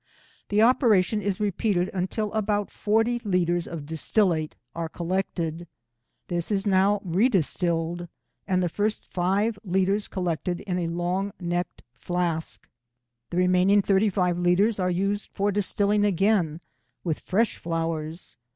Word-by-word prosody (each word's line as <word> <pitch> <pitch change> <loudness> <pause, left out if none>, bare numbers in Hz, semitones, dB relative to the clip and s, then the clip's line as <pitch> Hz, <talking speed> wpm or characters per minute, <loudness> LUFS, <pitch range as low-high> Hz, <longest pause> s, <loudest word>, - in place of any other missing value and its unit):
The 210 +2 +4
operation 220 -5 +3
is 200 -1 -2
repeated 200 -2 0
until 200 +3 -2
about 210 -1 0
forty 225 +3 +1
litres 175 -4 +1
of 160 -4 -6
distillate 160 +1 0 0.2
are 165 -1 -4
collected. 170 -1 -3 0.6
This 175 -2 -2
is 200 0 +1
now 200 +1 +3
redistilled, 175 - +1 0.4
and 185 -2 +1
the - - +2
first 210 +5 -2
five 200 +4 0
litres 190 +2 +1
collected 175 -1 -2
in 180 -3 -2
a 170 - -1
long 180 +4 -2
necked 175 0 -3
flask. 160 - -3 0.6
The 175 - -4
remaining 185 +2 +4
thirty 200 +2 +3
five 180 -2 0
litres 195 +5 +2
are 180 -1 +1
used 195 +3 -1
for 205 0 +1
distilling 205 +1 +1
again 195 -4 +2 0.4
with 165 -4 -1
fresh 220 +5 0
flowers. 165 0 -4
185 Hz, 130 wpm, -26 LUFS, 175-205 Hz, 0.6 s, The